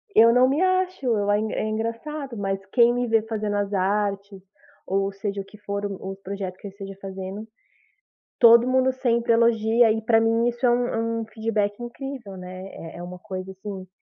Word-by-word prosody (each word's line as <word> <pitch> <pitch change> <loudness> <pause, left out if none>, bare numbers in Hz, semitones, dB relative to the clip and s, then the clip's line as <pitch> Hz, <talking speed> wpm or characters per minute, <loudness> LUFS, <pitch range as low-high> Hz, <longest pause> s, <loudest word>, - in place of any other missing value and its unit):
Eu 230 +1 +7
não 250 +1 +5
me 290 +5 +1
acho, 370 -5 +1
eu 210 -4 +1
ai 205 0 +3
é - - -2
é - - -1
engraçado, 230 +5 -4
mas 195 -1 -2
quem 235 +3 +4
me 245 0 -1
vê 225 -1 +3
fazendo 215 -2 -2
as 205 0 -1
artes, 200 0 -1 0.4
ou 195 +1 0
seja 200 0 -4
o 195 - -11
que 210 - -15
for 200 0 -4
o 195 -1 -5
os 195 - -9
projeto 195 -1 -5
que 200 - -9
eu - - -8
esteja 195 -1 -9
fazendo, 195 +2 -6 0.9
todo 235 +1 +8
mundo 260 0 +3
sempre 235 -2 +1
elogia 230 0 +4
e 220 +1 -1
pra 225 +1 +4
mim 225 +1 +2
isso 240 +1 -1
é - - +5
um 230 -1 0
um - - -5
feedback 215 -2 -2
incrível 240 -4 -7
,né, 185 +1 -8 0.3
é - - -10
é 175 - -7
uma 180 +1 -8
coisa, 185 -1 -6
assim, 190 -1 -8
215 Hz, 200 wpm, -24 LUFS, 195-235 Hz, 0.9 s, todo